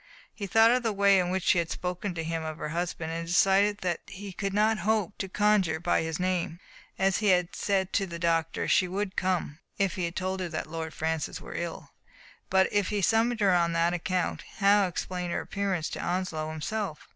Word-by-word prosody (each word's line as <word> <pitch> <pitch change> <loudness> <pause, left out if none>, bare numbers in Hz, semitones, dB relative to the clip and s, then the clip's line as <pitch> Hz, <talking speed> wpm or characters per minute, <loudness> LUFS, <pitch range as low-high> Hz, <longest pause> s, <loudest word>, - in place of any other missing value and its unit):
He 200 -2 -5
thought 225 +3 +6
of 250 +1 +3
the 225 -2 0
way 200 -1 +4
in 180 -1 0
which 190 0 -1
she 175 - +4
had 170 -1 -1
spoken 180 +1 -3
to 165 - -3
him 165 0 -3
of 155 -1 -5
her 150 - -4
husband, 165 0 -3
and 165 0 -4
decided 195 +4 +3
that 175 -2 -1
he 195 0 -8
could 195 +2 -3
not 215 +2 +2
hope 205 0 0
to 195 - -3
conjure 195 -5 +2
by 175 +1 +1
his 160 0 -3
name. 180 -2 -1 0.4
As 195 -1 +2
he 210 - 0
had 180 -2 +2
said 190 -2 0
to 195 - +1
the 170 -1 -6
doc 165 -1 +1
tor, - - -3
she 185 - +3
would 190 +1 -3
come 180 -4 -1 0.2
if 195 -2 +1
he 170 -2 -1
told 190 +2 -3
her 180 -2 -3
that 160 - -3
Lord 160 0 -6
Francis 160 -1 -2
were - - -9
ill; - - -5 0.6
but 190 0 +4
if 205 -2 +2
he 205 -2 -1
summoned 225 +3 +2
her 195 -2 +4
on 170 -1 +2
that 170 +1 +2
account, 180 +1 -1 0.2
how 200 -1 +4
explain 180 0 -4
her - - -1
appearance 195 -5 -2
to - - -5
Onslow 175 -4 -2
himself? 160 +2 -4
185 Hz, 215 wpm, -28 LUFS, 170-200 Hz, 0.6 s, thought